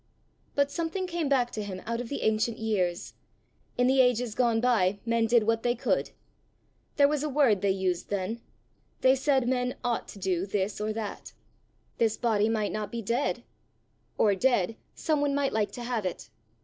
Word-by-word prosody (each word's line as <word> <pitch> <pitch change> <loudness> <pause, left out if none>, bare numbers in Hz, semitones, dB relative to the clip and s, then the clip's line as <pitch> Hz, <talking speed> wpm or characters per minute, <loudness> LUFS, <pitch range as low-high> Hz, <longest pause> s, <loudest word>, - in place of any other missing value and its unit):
But 285 0 +2
something 335 +4 -2
came 340 -5 -2
back 250 -3 +2
to 215 - -4
him 195 -3 -5
out 230 +1 -2
of 240 - -7
the 280 - -3
ancient 220 +1 +1
years: 190 -6 -1 0.6
in 245 - +3
the 260 +1 +5
ages 250 -2 +2
gone 235 -1 +2
by 215 -6 +2
men 230 -1 +2
did 235 -1 +4
what 225 +1 +1
they 240 +1 +1
could! 240 - 0 0.9
There 285 -1 +6
was 295 -1 0
a 305 - -1
word 260 -9 +3
they 200 - +2
used 190 -2 -1
then: 205 +4 -2 0.6
they 260 - +6
said 270 -2 +1
men 250 0 0
ought 240 -1 -1
to - - -11
do 185 -1 -1
this 200 +1 -2
or 215 +1 -1
that! 215 -2 -6 0.7
This 225 -2 +2
body 220 -2 +2
might 215 -2 0
not 210 -1 -4
be 235 -1 -4
dead 235 +7 -1 0.7
or 205 - +4
dead, 225 -1 +1 0.2
some 305 -2 0
one 285 -1 +1
might 285 -1 0
like 215 -2 +1
to 245 - -6
have 240 -3 -2
it! 115 -10 -7
230 Hz, 190 wpm, -28 LUFS, 210-260 Hz, 0.9 s, There